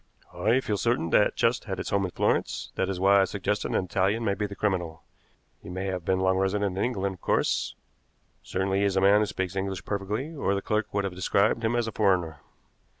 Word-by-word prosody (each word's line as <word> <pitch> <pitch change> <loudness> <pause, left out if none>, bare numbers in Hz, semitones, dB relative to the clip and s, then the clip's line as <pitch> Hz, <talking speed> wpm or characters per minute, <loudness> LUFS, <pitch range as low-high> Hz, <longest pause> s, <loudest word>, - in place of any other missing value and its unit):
I 115 +5 +2
feel 105 -5 -1
certain 100 -8 0
that 105 - +4
chest 115 +1 +1
had 95 -4 -4
its - - -4
home 100 -1 +2
in - - -3
Florence; - - -1
that 95 - -1
is 95 -2 -3
why 100 +1 +5
I - - +3
suggest 100 +2 -2
an - - -2
Italian 95 +5 0
may 100 - +2
be 105 +1 -2
the 100 - -9
criminal. 90 -6 -2 0.6
He - - -10
may 95 +2 -4
have 90 -2 -3
been 95 +1 +1
long 95 0 +2
resident 95 0 0
in 95 - 0
England, 100 -6 -1
of 90 - -16
course; - - 0 0.7
certainly 95 0 -1
he 100 - +2
is 100 -1 +1
a - - +3
man 100 +2 +6
who 105 - +1
speaks 95 -2 -3
English 95 -1 -3
perfectly, 105 +9 -3
or 100 -9 0
the 100 - -2
clerk 110 0 -1
would 100 0 0
have 95 -2 -3
described 100 +5 +1
him 115 +1 +1
as 120 -1 +1
a - - -3
foreigner." 90 -8 +1
100 Hz, 230 wpm, -27 LUFS, 95-105 Hz, 0.7 s, man